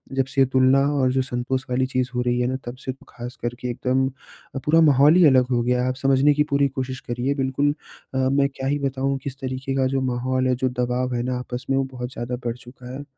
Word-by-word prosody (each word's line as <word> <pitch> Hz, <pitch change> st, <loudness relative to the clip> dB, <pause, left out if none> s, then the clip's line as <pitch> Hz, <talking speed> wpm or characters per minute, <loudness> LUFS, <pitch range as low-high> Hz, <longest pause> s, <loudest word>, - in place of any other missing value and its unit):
जब 135 Hz, -1 st, +2 dB
से 135 Hz, +1 st, +2 dB
तुलना 130 Hz, +1 st, +4 dB, 0.2 s
और 130 Hz, -1 st, +3 dB
जो 130 Hz, +1 st, +1 dB
संतोष 130 Hz, +1 st, -2 dB
वाली 125 Hz, +1 st, +1 dB
चीज़ 130 Hz, -1 st, -1 dB
हो 125 Hz, -, +1 dB
रही 125 Hz, 0 st, 0 dB
है 125 Hz, -, +1 dB
ना, 130 Hz, -, -1 dB
तब 120 Hz, +1 st, -6 dB
से 130 Hz, -, -1 dB, 0.2 s
ख़ासकर 120 Hz, 0 st, -6 dB
के 125 Hz, -, -4 dB
एकदम 130 Hz, +2 st, 0 dB
अ, 135 Hz, +1 st, -14 dB
पूरा 165 Hz, +2 st, +5 dB
माहौल 145 Hz, 0 st, +6 dB
ही 180 Hz, -2 st, +6 dB
अलग 130 Hz, -3 st, +5 dB
हो 120 Hz, -1 st, +2 dB
गया 125 Hz, +1 st, +1 dB
है। -, -, 0 dB
आप 130 Hz, -, -2 dB
समझने 135 Hz, +2 st, +3 dB
की 150 Hz, +1 st, +2 dB
पूरी 140 Hz, 0 st, +4 dB
कोशिश 130 Hz, -1 st, -4 dB
करिए 120 Hz, +3 st, 0 dB
बिल्कुल 140 Hz, +1 st, +1 dB, 0.4 s
अ, -, -, -2 dB
मैं 135 Hz, +1 st, +2 dB
क्या 130 Hz, -, -3 dB
ही 145 Hz, +1 st, 0 dB
बताऊँ 135 Hz, 0 st, -1 dB
किस 140 Hz, -1 st, -6 dB
तरीके 130 Hz, +1 st, -3 dB
का 135 Hz, -1 st, +2 dB
जो 135 Hz, -, +1 dB
माहौल 130 Hz, +1 st, 0 dB
है 130 Hz, -, +2 dB
जो 130 Hz, -, +1 dB
दबाव 125 Hz, +1 st, -1 dB
है 120 Hz, -, -1 dB
ना 125 Hz, 0 st, -2 dB
आपस 125 Hz, 0 st, -6 dB
में, 135 Hz, -, +2 dB
वो 135 Hz, -, +2 dB
बहुत 125 Hz, -1 st, -6 dB
ज़्यादा 120 Hz, +1 st, -4 dB
बढ़ 120 Hz, -1 st, -1 dB
चुका 125 Hz, 0 st, -12 dB
है। 140 Hz, +2 st, -6 dB
130 Hz, 250 wpm, -23 LUFS, 125-135 Hz, 0.4 s, माहौल